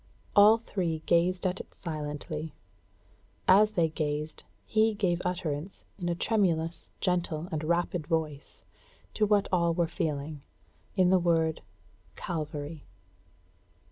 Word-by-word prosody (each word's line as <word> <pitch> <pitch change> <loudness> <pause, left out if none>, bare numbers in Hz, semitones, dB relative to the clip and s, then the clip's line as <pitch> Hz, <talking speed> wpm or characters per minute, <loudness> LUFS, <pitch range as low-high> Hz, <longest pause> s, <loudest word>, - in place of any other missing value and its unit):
All 210 +2 +8
three 175 -8 -3
gazed 180 +2 +2
at 185 +1 0
it - - -10
silently. 155 -1 -5 0.9
As 210 +3 +6
they 170 -4 +3
gazed, 150 0 -3 0.2
he 220 0 +2
gave 180 -4 0
utterance 175 -1 -3
in 175 -2 -2
a 170 - 0
tremulous, 170 -5 0
gentle, 175 -3 0
and 155 -1 -2
rapid 170 -1 0
voice, 155 -4 -3 0.5
to 215 - +2
what 205 -1 +3
all 170 -2 +2
were 170 -1 +2
feeling, 150 -2 -3 0.5
in 185 -2 +4
the 190 - +5
word 165 -2 +1 0.5
"CALVARY!" 155 -3 -5
170 Hz, 120 wpm, -29 LUFS, 155-185 Hz, 0.9 s, All